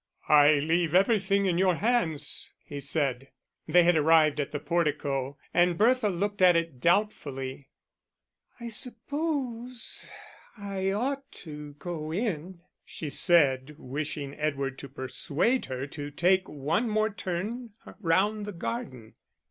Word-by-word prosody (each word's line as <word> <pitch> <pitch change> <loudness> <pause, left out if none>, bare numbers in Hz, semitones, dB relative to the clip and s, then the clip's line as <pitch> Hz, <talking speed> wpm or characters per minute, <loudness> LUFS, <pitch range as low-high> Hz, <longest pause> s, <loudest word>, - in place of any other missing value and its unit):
"I 150 0 +7
leave 160 +3 +1
everything 200 0 +3
in 180 -2 +1
your 185 -2 +3
hands," 165 -10 -1
he 145 - -7
said. 135 -2 -1 0.4
They 175 0 +5
had 175 0 +4
arrived 155 -1 +4
at 145 - -2
the 145 - -3
portico, 145 -4 -1 0.2
and 175 0 +3
Bertha 235 0 +3
looked 200 +2 -2
at 180 -1 +7
it 165 -6 -1
doubtfully. 140 -7 -1 0.9
"I 235 -1 -6
suppose 255 -1 -2 0.5
I 195 -2 -2
ought 270 +6 -2
to 150 -2 -8
go 155 0 -6
in," 180 -3 -3 0.2
she 150 -3 -6
said, 145 -4 +3
wishing 145 0 -5
Edward 140 -3 -2
to 140 - -9
persuade 150 - 0
her 130 +1 -4
to 145 0 -7
take 185 +5 +2
one 150 - -1
more 215 +1 +1
turn 205 +5 -4 0.3
round 205 +4 +1
the 205 - -5
garden. 170 - -5
170 Hz, 130 wpm, -28 LUFS, 145-205 Hz, 0.9 s, I